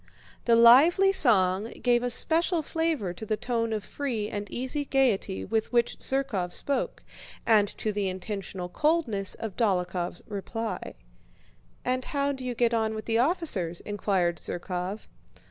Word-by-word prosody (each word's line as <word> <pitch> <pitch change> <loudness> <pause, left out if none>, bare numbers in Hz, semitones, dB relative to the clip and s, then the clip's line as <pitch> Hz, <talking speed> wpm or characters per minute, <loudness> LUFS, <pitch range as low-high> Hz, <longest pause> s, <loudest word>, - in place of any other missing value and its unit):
The 235 - +4
lively 285 +12 +6
song 200 - +5 0.2
gave 240 -1 +3
a 245 - -1
special 330 +6 +4
flavor 320 - -2
to 180 - -10
the 215 0 -2
tone 230 -1 -2
of 215 -2 -2
free 230 -6 -4
and 205 0 -5
easy 260 +4 -3
gaiety 250 -9 0
with 220 +1 -2
which 240 -1 +1
Zherkóv 250 -10 -1
spoke, 275 -3 -2 0.4
and 215 -3 +4
to 215 - -2
the 200 -2 -1
intentional 185 -1 -5
coldness 235 - 0
of 220 -4 -6
Dólokhov's 180 -5 -1
reply. 220 +2 -5 0.9
"And 255 0 -1
how 280 -1 -1
do 265 -2 -6
you 250 -1 -4
get 235 0 +1
on 220 -1 0
with 215 - -6
the 225 0 +1
officers?" 240 - 0
inquired 190 -4 -1
Zherkóv. 180 +5 -5
225 Hz, 145 wpm, -27 LUFS, 195-260 Hz, 0.9 s, lively